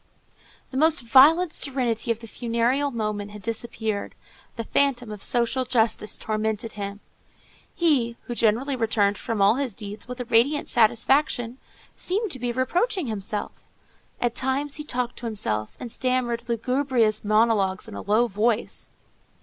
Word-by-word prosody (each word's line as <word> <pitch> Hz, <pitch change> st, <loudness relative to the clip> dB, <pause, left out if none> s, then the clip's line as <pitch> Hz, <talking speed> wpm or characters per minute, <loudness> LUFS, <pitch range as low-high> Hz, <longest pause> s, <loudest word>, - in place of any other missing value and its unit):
The 260 Hz, -, -4 dB
almost 315 Hz, 0 st, +4 dB
violent 300 Hz, +8 st, +6 dB
serenity 245 Hz, -5 st, -1 dB
of 230 Hz, 0 st, 0 dB
the 230 Hz, -, -9 dB
funereal 240 Hz, +5 st, 0 dB
moment 210 Hz, -4 st, -3 dB
had 205 Hz, -1 st, -11 dB
disappeared; 225 Hz, -2 st, -3 dB, 0.4 s
the 230 Hz, -, -3 dB
phantom 245 Hz, -2 st, +1 dB
of 210 Hz, -2 st, -8 dB
social 245 Hz, +1 st, +1 dB
justice 225 Hz, -3 st, +1 dB
tormented 220 Hz, 0 st, -2 dB
him. 200 Hz, -1 st, -6 dB, 0.7 s
He, 270 Hz, -10 st, +2 dB
who 240 Hz, -, -5 dB
generally 235 Hz, +5 st, +1 dB
returned 215 Hz, -4 st, +1 dB
from 220 Hz, -4 st, -1 dB
all 205 Hz, +5 st, +5 dB
his 265 Hz, -7 st, -2 dB
deeds 210 Hz, -1 st, -6 dB
with 250 Hz, +1 st, -7 dB
a 245 Hz, -, -3 dB
radiant 245 Hz, +7 st, +2 dB
satisfaction, 245 Hz, +2 st, +2 dB, 0.4 s
seemed 405 Hz, +2 st, -1 dB
to 260 Hz, -, -4 dB
be 245 Hz, 0 st, -1 dB
reproaching 345 Hz, -, 0 dB
himself. 210 Hz, -2 st, -4 dB, 0.6 s
At 240 Hz, -1 st, 0 dB
times 270 Hz, +3 st, -1 dB
he 300 Hz, -, -5 dB
talked 245 Hz, -4 st, -3 dB
to 235 Hz, -, -5 dB
himself, 110 Hz, -, -3 dB
and 240 Hz, -, -6 dB
stammered 245 Hz, -2 st, -1 dB
lugubrious 240 Hz, -2 st, +1 dB
monologues 215 Hz, -3 st, +2 dB
in 220 Hz, -, -9 dB
a -, -, -6 dB
low 215 Hz, +4 st, +3 dB
voice. 220 Hz, +1 st, -1 dB
235 Hz, 150 wpm, -25 LUFS, 215-260 Hz, 0.7 s, violent